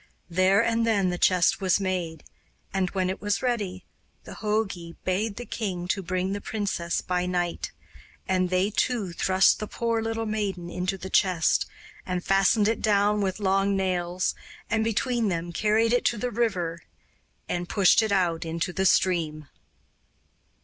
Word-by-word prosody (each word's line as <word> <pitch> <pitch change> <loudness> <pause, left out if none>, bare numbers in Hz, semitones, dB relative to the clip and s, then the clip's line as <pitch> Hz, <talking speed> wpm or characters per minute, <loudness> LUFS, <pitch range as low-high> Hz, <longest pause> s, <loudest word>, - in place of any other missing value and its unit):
There 190 +4 +4
and 230 0 +1
then 200 -5 +2
the 175 - -4
chest 180 +1 +3
was 185 0 +3
made, 180 -4 -3 0.5
and, 190 -2 0
when 185 -1 -1
it 190 - -4
was 205 +3 -1
ready, 205 -7 -2 0.4
the - - -10
jogi 205 -6 -2
bade 200 +3 -1
the 245 - -7
king 185 -7 -4
to 195 - 0
bring 185 +1 -2
the 205 - -4
princess 195 -6 -2
by 180 0 -1
night; 175 -1 -2 0.6
and 185 -1 +1
they 185 +3 +1
two 215 -4 0
thrust 185 +2 +3
the 215 - -4
poor 230 0 -1
little 225 0 -2
maiden 200 -5 -3
into 185 +2 -2
the 190 +1 -8
chest 180 -4 +2 0.4
and 180 -1 -3
fastened 195 +2 +3
it 225 - 0
down 210 0 +2
with 190 0 -1
long 195 0 +2
nails, 180 -1 0 0.4
and 220 0 +2
between 230 +1 0
them 170 -2 -2
carried 220 +5 +2
it 245 - +2
to 235 - +2
the 245 +4 -2
river 180 -8 -1 0.7
and 175 0 -3
pushed 200 +1 +5
it 220 -2 -1
out 175 -4 +1
into 165 +2 -3
the 190 +1 +2
stream. 160 -5 +1
190 Hz, 165 wpm, -26 LUFS, 180-215 Hz, 0.7 s, pushed